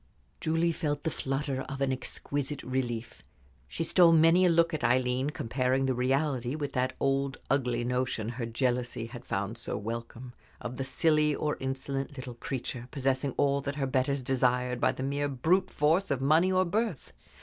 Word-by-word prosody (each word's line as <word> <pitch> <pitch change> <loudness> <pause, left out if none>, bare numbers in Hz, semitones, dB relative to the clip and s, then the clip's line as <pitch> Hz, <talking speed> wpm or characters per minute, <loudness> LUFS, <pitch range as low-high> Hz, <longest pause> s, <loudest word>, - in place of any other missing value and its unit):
Julie 165 +1 +1
felt 145 -2 -2
the 160 - 0
flutter 135 0 -2
of 135 0 -5
an 135 -1 +1
exquisite 140 +2 -3
relief. 120 -3 -3 0.5
She 115 - -3
stole 170 +1 +5
many 165 +3 +6
a - - +4
look 170 0 +3
at 155 - -2
Aileen, 125 +3 +2
comparing 130 0 0
the 130 - +1
reality 130 0 0
with 145 -2 -4
that 130 0 0
old, 135 0 0
ugly 125 -3 +1
notion 125 -3 -1
her 120 -1 -4
jealousy 120 0 -1
had 120 +1 -9
found 100 +4 -3
so - - -3
welcome 115 +3 -6 0.3
of 120 +1 -6
the 135 - -2
silly 150 +2 +2
or 150 -1 -1
insolent 135 +1 -3
little 130 -1 -6
creature, 125 0 -5
possessing 135 -1 -1
all 140 0 +2
that 140 +1 -4
her 140 -2 -1
betters 130 +1 0
desired, 125 -1 +1
by - - +4
the 130 - -5
mere 140 +1 0
brute 175 +8 +2
force 165 +6 +2
of 140 -3 0
money 155 +7 +4
or 185 0 +3
birth. 205 - -2
135 Hz, 175 wpm, -29 LUFS, 125-150 Hz, 0.5 s, many